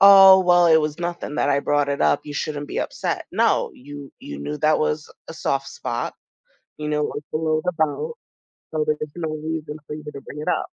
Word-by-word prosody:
oh 195 -1 +10
well, 175 -1 +5
it 160 - +7
was 150 -1 0
nothing 175 -3 -4
that 140 - +1
I 140 - +3
brought 145 0 +1
it 140 - -1
up, 75 -1 +3
you 145 - -7
shouldn't 145 0 -3
be - - -3
upset. - - -2
No, - - +2
you 145 +1 -10
you 70 - -7
knew 75 +1 -4
that 155 0 +3
was 155 0 -1 0.2
a 160 - -7
soft 135 -2 -1
spot, - - -4 0.6
you 150 0 -4
knew 150 0 0
it 150 - +1
was 145 - -5
below 155 0 0
the 180 - +1
belt 170 - -1 0.5
so 155 -1 0
there's 150 0 0 0.2
no 165 -2 -3
reason 155 0 -4
for - - -5
you 150 - -9
to 150 -2 -7
bring 150 - -8
it - - -7
up. - - +1
150 Hz, 225 wpm, -23 LUFS, 145-160 Hz, 0.6 s, oh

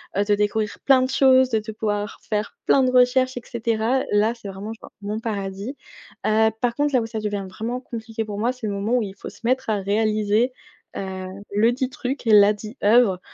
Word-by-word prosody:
heu, 200 - +2
de 205 0 +2
découvrir 210 +1 -1
plein 265 -2 +6
de 255 - 0
choses 260 -1 +5
de 220 -2 +1
de 215 +1 -7
pouvoir 205 -1 -3
faire 210 -1 -2
plein 270 - +5
de 255 - +2
recherches 255 +1 +3
et 245 - -5
cetera. 230 +2 0
Là 215 +3 +3
c'est 220 -3 -10
vraiment 195 +3 -6
genre, - - -13
mon 210 +2 -3
paradis. 200 +2 -4 0.5
Heu, 220 +1 +3
par 240 -1 +1
contre 290 +1 0
là 250 - +4
où - - -3
ça 225 -1 -4
devient 205 -2 -3
vraiment 230 +6 -4
compliqué 225 -2 -5
pour 205 -1 -6
moi 240 +3 +1
c'est 245 -4 -6
le 200 - -2
moment 200 +4 -2
où - - +1
il 195 -2 -5
faut - - -8
se - - -17
mettre 255 +3 +3
à 210 - +1
réaliser, 215 +3 +1 0.4
heu, 190 -1 -5 0.3
le 220 +4 +3
dit 260 +1 -2
truc, 270 -1 -4
la 210 -2 +6
dit 215 +5 -10
œuvre 210 -4 +4
220 Hz, 220 wpm, -23 LUFS, 205-250 Hz, 0.5 s, plein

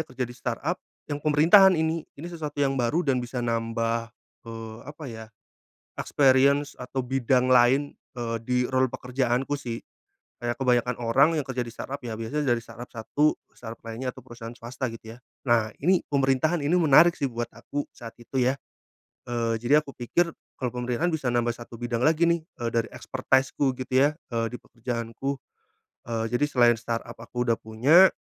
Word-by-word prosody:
kerja 130 0 -3
di 120 - -8
startup, 125 +8 -3 0.3
yang 145 - -3
pemerintahan 170 +6 +6
ini 160 0 -1
ini 155 - -7
sesuatu 150 -3 -5
yang 140 -1 +2
baru 155 +9 +1
dan 130 -3 +2
bisa 120 0 -4
nambah, 115 0 -1 0.4
eee, 115 0 -7
apa 150 +1 -9
ya 110 0 -8 0.7
experience 140 +1 +3
atau 130 +1 -3
bidang 130 0 +1
lain, 130 +3 +4 0.2
eee, 115 -2 -2
di 125 0 +1
role 130 0 +3
pekerjaanku 125 +2 -1
sih. 120 -4 -5 0.6
Kayak 120 0 -2
kebanyakan 125 -2 +1
orang 135 +6 +5
yang 150 - 0
kerja 130 -2 -3
di 120 - -3
startup 135 +4 -6
ya 115 -4 -5
biasanya 135 +6 -2
dari 115 - -7
startup 120 +1 -10
satu 145 +6 +1
ke - - -42
startup 115 -1 -10
lainnya 115 +3 -5
atau 130 0 -7
perusahaan 120 0 -9
swasta 125 +2 -4
gitu 115 -1 -9
ya. 120 - -13 0.3
Nah 115 -4 +3 0.2
ini 185 0 +4
pemerintahan 140 +3 +2
ini 150 - +1
menarik 160 +3 +7
sih 140 -5 -2
buat 120 -1 -4
aku 130 +5 -4
saat 115 -2 -10
itu 125 +2 -3
ya, 130 +2 +2 0.7
eee, 115 -2 -1
jadi 145 +6 +4
aku 140 - -10
pikir 170 +8 0 0.3
kalau 125 - -1
pemerintahan 125 +7 -1
bisa 155 -5 -2
nambah 120 -1 +1
satu 120 0 -11
bidang 120 0 -2
lagi 160 +2 +3
nih, 170 -1 +2 0.2
eee, 115 - 0
dari 115 0 0
expertise-ku 130 0 +1
gitu 130 0 -6
ya, 155 - -4 0.2
eee, 115 0 +1
di - - -4
pekerjaanku. 120 +3 -4 0.7
Eee, 115 -1 -1
jadi 125 +4 +2
selain 120 -3 +4
startup 115 0 -4
aku 120 +1 -3
udah 115 -2 +1
punya, 135 +12 +6
125 Hz, 175 wpm, -26 LUFS, 115-140 Hz, 0.7 s, menarik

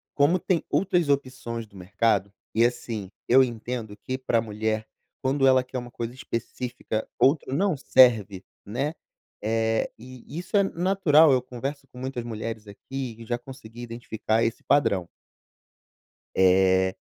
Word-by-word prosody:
como 150 +6 +4
tem 180 -1 0
outras 180 -4 +2
opções 130 -5 -2
do 100 - -21
mercado, 100 +2 0 0.2
e 115 +1 +5
assim, 115 -5 -3 0.2
eu 130 +2 +7
entendo 115 -2 -4
que 130 +5 -4
para 130 -3 +1
a - - 0
mulher, 110 0 -2 0.3
quando 135 +1 +2
ela 130 -1 +5
quer 130 +1 -6
uma 120 -1 -6
coisa 120 0 -5
específica, 120 -2 -4
outra 135 -1 +3
não 185 +1 +1
serve, 110 -8 +4 0.2
né? 135 +9 -2 0.5
É, 110 +1 0
e 125 +1 -12
isso 180 +4 -5
é 200 - +5
natural. 170 -5 +4
Eu 130 -1 +3
converso 135 +3 -6
com 125 - -17
muitas 130 -2 -4
mulheres 110 -1 -5
aqui 125 +4 -6
e 115 - -9
já 120 +1 -1
consegui 120 -2 -11
identificar 115 -1 -1
esse 115 - -2
padrão. 100 -11 +2 1.3
Eh, 95 0 +4
120 Hz, 150 wpm, -26 LUFS, 110-135 Hz, 1.3 s, eu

